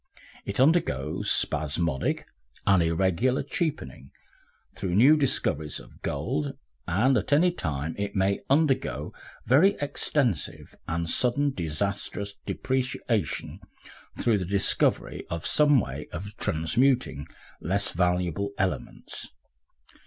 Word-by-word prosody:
It 100 - -4
undergoes 135 - +2
spasmodic 75 -1 +1 0.4
and 95 -2 +5
irregular 95 +10 +1
cheapening 155 - -3 0.6
through 90 -2 -3
new 130 +9 +7
discoveries 80 - 0
of - - -16
gold, 135 - -2 0.3
and 110 +10 +3
at - - -6
any 170 +5 +5
time 75 - -3
it 100 0 -3
may 95 0 +2
undergo 140 -1 +1 0.3
very 155 - +5
extensive 140 - -1
and 85 +1 -2
sudden 125 +10 +1
and 140 -2 0
disastrous 100 +4 -2
depreciation 130 -1 -2 0.6
through 110 -4 +2
the 90 - -3
discovery 100 +2 +1
of 85 -1 -4
some 145 -2 +4
way - - -5
of 100 +4 -7
transmuting 80 - +1 0.3
less 100 +5 0
valuable 90 +3 0
elements. 95 -1 -3
100 Hz, 110 wpm, -27 LUFS, 85-135 Hz, 0.6 s, new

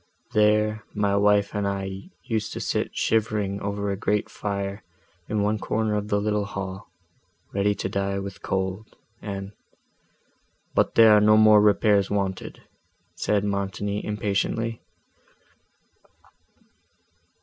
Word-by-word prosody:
There, 105 0 +2
my 100 -1 +1
wife 100 0 +3
and 105 -1 -1
I 95 - -4
used 110 -4 -2
to - - -5
sit - - -2
shivering 105 -3 0
over 100 0 -2
a - - -1
great 105 +1 -1
fire 100 0 -4 0.5
in 105 -1 0
one 105 +1 0
corner 110 0 -1
of 105 0 -2
the 100 -1 +1
little 105 0 0
hall, 95 0 -6 0.6
ready 100 +1 +1
to - - -3
die 100 0 -2
with 100 0 -6
cold, 95 +3 -3 0.3
and—" 100 -1 -5 1.2
"But - - +1
there 110 -2 +8
are 105 - +5
no 105 +1 +6
more 110 -1 +7
repairs 105 -1 +3
wanted," 95 -2 -3 0.5
said 105 -1 0
Montoni, 100 0 -2
impatiently. 105 +2 -2
105 Hz, 125 wpm, -25 LUFS, 100-105 Hz, 1.2 s, there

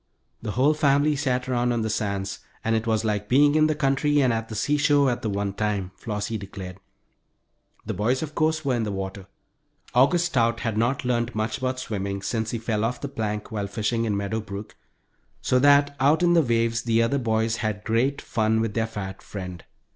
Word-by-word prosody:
The 105 -2 -4
whole 140 +5 +3
family 145 0 +3
sat 130 -3 -1
around 125 -1 +1
on 115 -2 0
the 110 - -1
sands, 100 -2 -2 0.2
and 110 0 +1
it 110 +1 -1
was 110 -1 +1
like 105 -1 -1
being 145 +3 +5
in 155 0 +4
the 155 - 0
country 145 +1 +2
and 130 -3 +3
at 115 0 -3
the 110 - -6
seashore 145 +2 +3
at 120 - -3
the 110 - -2
one 100 0 -2
time, 100 -3 -2
Flossie 105 0 -4
declared. 95 -1 -8 1.1
The - - -3
boys, 120 - 0
of 155 -1 -6
course, 155 -1 0
were 135 - +2
in 120 - 0
the 105 -2 -2
water. 95 0 -5 0.7
August 145 +8 +4
Stout 115 -8 +1
had 115 -2 -1
not 120 +4 0
learned 120 -1 0
much 110 +4 -1
about 130 0 -2
swimming 100 -4 -4
since 110 0 -1
he 115 - -2
fell 110 -1 -1
off 120 +2 -1
the 140 - -5
plank 105 -5 -4
while 105 -2 -2
fishing 115 +2 -1
in 105 -3 0
Meadow 100 +3 -2
Brook, 100 +1 -8 0.6
so 125 - +2
that 145 +1 +5
out 150 +6 +3
in 175 0 +4
the 170 - +6
waves 115 -3 +1
the 115 -1 +2
other 140 +4 +1
boys 110 -1 0
had 105 -2 -3
great 120 +6 0
fun 110 -1 +1
with 110 -2 -1
their 115 0 0
fat 95 -4 -6
friend. 90 -4 -7
115 Hz, 205 wpm, -25 LUFS, 105-135 Hz, 1.1 s, the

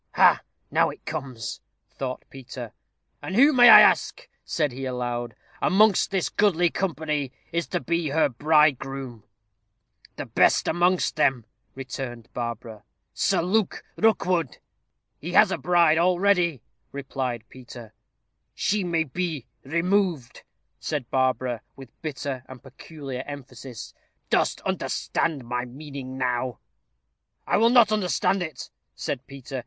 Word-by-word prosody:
"Ha! - - +5 0.3
now - - +3
it - - -11
comes," 135 -7 -5 0.3
thought 130 -1 -5
Peter. 125 -3 -9 0.5
"And 185 - -5
who, 280 +6 +6
may 245 -2 +8
I - - +11
ask," - - +2 0.2
said 150 -4 -1
he, 135 +2 -6
aloud, 120 -2 -3 0.3
"amongst 210 +1 +4
this 190 -2 0
goodly 175 -5 +2
company, 155 -7 -2 0.2
is 170 0 -2
to 180 - -2
be 170 +2 -1
her 155 +2 +3
bridegroom?" 135 -3 +1 0.9
"The - - -5
best - - +3
amongst 175 +2 +1
them," 130 -6 +2 0.3
returned 125 -3 -7
Barbara 115 -2 -5 0.3
"Sir - - +1
Luke 200 +3 0
Rookwood." 180 - +1 0.6
"He - - -6
has - - +6
a - - -2
bride 170 -2 +3
already," 180 - +2 0.3
replied 130 -4 -4
Peter. 120 -3 -12 0.6
"She 205 -1 0
may 170 -2 0
be 160 -2 -4 0.2
removed," 170 - 0 0.4
said 145 -6 -4
Barbara, 130 -2 0
with 135 -3 -12
bitter 140 -4 -4
and 130 -1 -11
peculiar 135 -1 -8
emphasis. 135 -3 -9 0.4
"Dost - - +1
understand 145 -7 -2
my 125 +1 -2
meaning 135 0 -8
now?" 125 -2 -1 0.9
"I - - +2
will 230 +2 +5
not 235 -3 +5
understand 195 -1 +1
it," 160 -6 -6 0.2
said 130 -1 -5
Peter. 135 -1 -7
140 Hz, 125 wpm, -25 LUFS, 125-175 Hz, 0.9 s, I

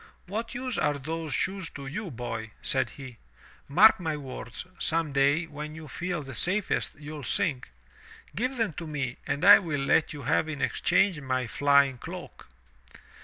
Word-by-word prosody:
"What 225 +5 -4
use 255 0 -2
are 150 0 +2
those 160 +2 -4
shoes 190 +3 -1
to 140 - -7
you, 185 +9 -4
boy?" 115 -4 -5
said - - +1
he. 130 -4 -11 0.5
"Mark 195 +11 +7
my 160 -4 -2
words, 130 -1 -7
some 165 -2 0
day 140 +4 +3
when 150 0 -7
you 160 -1 -9
feel 175 0 -3
the 135 -1 -8
safest, 185 - 0
you'll 150 0 -8
sink. 130 - -1 0.7
Give 255 +5 -1
them 225 -7 0
to 165 - -5
me 140 -5 -3
and 145 - -1
I 205 +1 +11
will 155 -7 -2
let 140 +3 +3
you 145 -2 -7
have 150 +4 +1
in 155 -3 -4
exchange 180 0 +2
my 130 -2 -1
flying 140 +1 +3
cloak. - - -9
150 Hz, 170 wpm, -28 LUFS, 140-180 Hz, 0.7 s, I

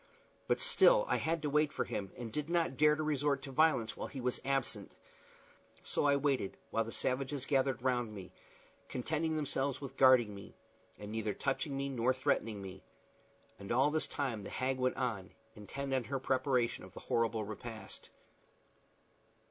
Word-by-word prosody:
But - - +2
still - - +6
I - - +2
had 165 -1 -1
to 150 - 0
wait 150 0 +3
for - - -2
him, 100 -2 -4
and 120 -2 -6
did 150 +6 -3
not 170 -5 +1
dare 150 +2 +5
to 155 - -2
resort 145 -2 0
to 135 - -7
violence 135 -6 +2
while - - -5
he 135 - -7
was 125 0 -1
absent; 135 -2 -1 0.9
so - - 0
I 140 -1 +5
waited, 140 -8 0
while 115 - +1
the 115 - -7
savages 135 +2 -1
gathered 135 -3 +1
round 120 -3 +1
me, 95 -3 -9 0.6
contenting 155 +5 -1
themselves 140 -3 -1
with 135 -1 -8
guarding 130 -5 +6
me, 100 0 -11 0.4
and 105 0 -8
neither 110 -1 -2
touching 135 +1 -1
me 140 0 -1
nor 130 -1 +1
threatening 110 -5 0
me. 95 0 -8 0.8
And 100 - -7
all 135 +5 +4
this 155 0 0
time 125 -8 -3
the - - -7
hag 130 0 -1
went 130 0 +1
on, 110 -8 -3 0.2
intent 135 +6 -5
on 130 -3 0
her 135 +3 -2
preparation 130 -2 0
of - - -12
the - - -8
horrible 115 -1 0
repast. 110 +2 -8
130 Hz, 175 wpm, -34 LUFS, 115-140 Hz, 0.9 s, still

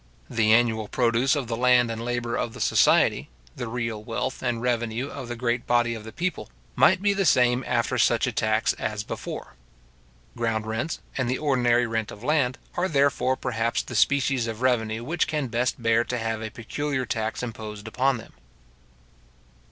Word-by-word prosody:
The 110 -1 +2
annual 110 -2 +3
produce 125 +5 +2
of 140 -3 -2
the 115 0 -3
land 125 0 +4
and 115 0 -5
labour 120 -1 -2
of 115 - -2
the - - -9
society, - - +3 0.3
the 120 - -5
real 115 -2 -3
wealth 120 +3 -3
and 120 -2 -1
revenue 120 +1 -1
of 130 -3 -7
the 120 - -4
great 120 0 -1
body 120 -1 +2
of 110 -2 -7
the 110 - -8
people, 175 - -3 0.3
might 185 +1 +4
be 200 -1 +3
the 195 0 0
same 125 -5 +3
after 120 -1 0
such - - +3
a - - -1
tax - - +1
as 105 -1 -2
before. - - -6 0.8
Ground 115 -2 -1
rents, 110 +9 -3 0.2
and 125 -2 0
the 130 - 0
ordinary 125 -5 +2
rent 115 -2 -2
of 105 - -10
land, 135 -3 +1 0.2
are 180 +1 +1
therefore, 140 -4 +2
perhaps, 115 -3 -1
the - - -9
species 135 -3 +2
of 115 +2 -5
revenue 115 -3 +1
which 165 +8 0
can 150 -4 -2
best 120 +2 0
bear 115 0 +3
to 125 - -2
have 115 -1 -2
a 110 - -4
peculiar 130 +3 -3
tax 110 +1 -3
imposed 110 -3 -7
upon 130 +3 +1
them. 115 - -12
120 Hz, 185 wpm, -25 LUFS, 115-130 Hz, 0.8 s, land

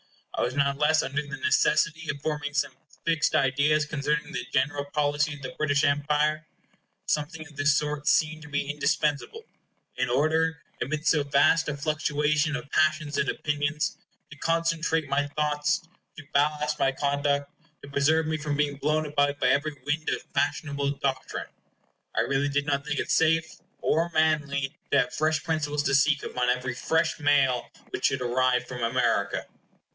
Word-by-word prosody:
I - - -2
was 130 - -2
not 140 -1 +1
less 155 +1 +3
under 140 +2 -1
the 145 -1 -7
necessity 165 - +2
of 140 -1 -4
forming 150 -2 -3
some 135 -3 0 0.3
fixed 165 -2 +2
ideas 145 +2 +3
concerning 150 0 -2
the 125 -1 -4
general 145 +2 0
policy 145 0 0
of 145 - -13
the 130 - -6
British 145 -2 +1
Empire. 150 +2 +1 0.6
Something 155 +1 -2
of 150 -1 -16
this 145 0 +3
sort 150 -1 -2
seemed 155 0 +2
to 150 - -11
be 145 -1 -1
indispensable, 150 - -1 0.5
in 125 0 -1
order, 160 +5 +1 0.2
amidst 155 +4 0
so 150 - +2
vast 140 +3 +3
a 145 - -3
fluctuation 150 +1 0
of 145 - -7
passions 155 -1 +1
and - - +1
opinions, 150 0 -1 0.3
to 150 - -11
concentre 165 0 0
my 145 +1 +1
thoughts, 150 +3 0 0.3
to 160 - -8
ballast 150 +1 +1
my 135 - +3
conduct, 140 +1 0 0.3
to - - -9
preserve 155 +3 +2
me 155 0 -1
from 145 -1 -3
being 145 -1 0
blown 155 +2 0
about 145 -1 +1
by 125 - +3
every 145 +3 +1
wind 150 +2 -1
of - - -2
fashionable 140 -2 0
doctrine. 135 -2 -3 0.7
I - - +3
really 140 +1 0
did 145 0 0
not 140 -2 0
think 150 -1 -1
it - - -2
safe 160 0 +2 0.3
or 165 +2 +2
manly 150 -3 +1
to 140 - +4
have 125 0 -4
fresh 155 +1 0
principles 150 -2 -1
to 140 - 0
seek 145 +1 +3
upon 125 0 -1
every 125 +1 0
fresh 160 +6 0
mail 140 -4 +2 0.2
which - - -2
should 130 - +1
arrive 125 0 +1
from 125 -1 -6
America. 115 -3 0
145 Hz, 170 wpm, -27 LUFS, 140-155 Hz, 0.7 s, to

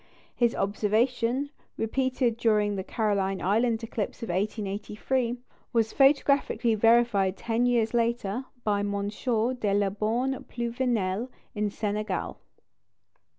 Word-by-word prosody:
His 235 -1 +2
observation, 230 +6 0 0.3
repeated 250 +1 0
during 210 -3 +2
the 190 - -3
Caroline 195 -3 0
Island 225 +4 +1
eclipse 225 +1 -4
of - - -5
1883, 210 +5 -1 0.4
was 225 -2 +1
photographically 275 -3 +3
verified 220 -4 +3
ten 235 +3 0
years 235 -2 +2
later 235 0 0 0.2
by 205 -1 +1
M. 205 0 -1 0.2
de 230 -1 0
la 200 -1 +2
Baume 235 +6 -1
Pluvinel 235 -3 -1 0.2
in 210 -1 -1
Senegal. 210 +1 -3
225 Hz, 110 wpm, -27 LUFS, 205-245 Hz, 0.4 s, photographically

